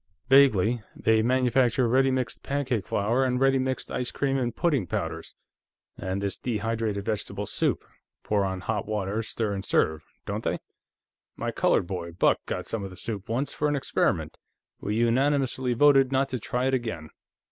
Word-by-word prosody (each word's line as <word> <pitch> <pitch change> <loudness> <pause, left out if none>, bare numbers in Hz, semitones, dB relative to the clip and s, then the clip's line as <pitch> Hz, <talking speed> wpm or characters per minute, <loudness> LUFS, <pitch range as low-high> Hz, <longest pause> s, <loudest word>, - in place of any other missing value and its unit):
"Vaguely. 125 -4 +5
They 110 0 +3
manufacture 125 0 +2
ready 135 +3 +3
mixed 130 -1 -2
pancake 135 -6 -2
flour, 115 +6 +1
and 125 -1 +1
ready 135 0 +3
mixed 130 0 -2
ice 125 -1 -1
cream 135 -1 -1
and 120 -3 -1
pudding 140 - +1
powders, - - -4 0.6
and 95 +1 -3
this 100 -1 -3
dehydrated 110 -3 -2
vegetable 105 -2 -3
soup - - -1 0.4
pour 105 -2 +1
on 95 -1 -2
hot 105 +2 -2
water, 105 0 -1
stir, 110 -1 -2
and 95 -1 -4
serve 80 -4 +1 0.2
don't - - -3
they? - - 0 0.8
My - - -3
colored - - +2
boy, 85 -2 -5
Buck, 85 - +3
got 90 - -3
some 115 -3 -3
of 95 - -5
the 95 - -12
soup, 105 -1 -5
once, 125 +5 -1
for 150 - 0
an 145 - +1
experiment. 140 - 0 0.4
We 105 - -2
unanimously 130 +1 +1
voted 135 0 +5
not 135 +1 +1
to 130 - -3
try 125 +3 -2
it 135 - +1
again." 110 -12 -3
115 Hz, 170 wpm, -27 LUFS, 100-130 Hz, 0.8 s, Vaguely